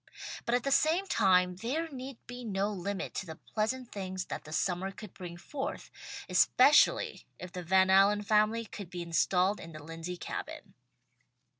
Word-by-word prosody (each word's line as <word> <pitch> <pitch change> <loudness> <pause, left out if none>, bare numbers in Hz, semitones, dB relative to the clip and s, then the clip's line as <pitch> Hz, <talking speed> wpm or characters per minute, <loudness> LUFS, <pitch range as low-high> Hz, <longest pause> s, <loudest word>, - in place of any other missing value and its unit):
But 235 - +3
at 245 - 0
the 275 - -1
same 325 +7 +3
time 180 - +3
there 270 - -2
need 265 -1 -7
be 245 +1 -8
no 200 -2 -1
limit 195 0 -4
to 190 - -4
the 160 - -7
pleasant 230 +7 -3
things 185 -2 -4
that - - -6
the 155 - -10
summer 180 +3 0
could 200 0 -10
bring 175 -2 -8
forth, 280 - -5 0.4
especially - - +4
if 180 - -8
the 180 - -5
Van 190 +2 +4
Allen 200 +2 +5
family 215 +2 +2
could 200 -3 -9
be 175 -1 -5
installed 180 +4 +2
in 165 0 -10
the 155 -1 -9
Lindsey 165 +3 -6
Cabin. - - -7
195 Hz, 170 wpm, -31 LUFS, 180-230 Hz, 0.4 s, Allen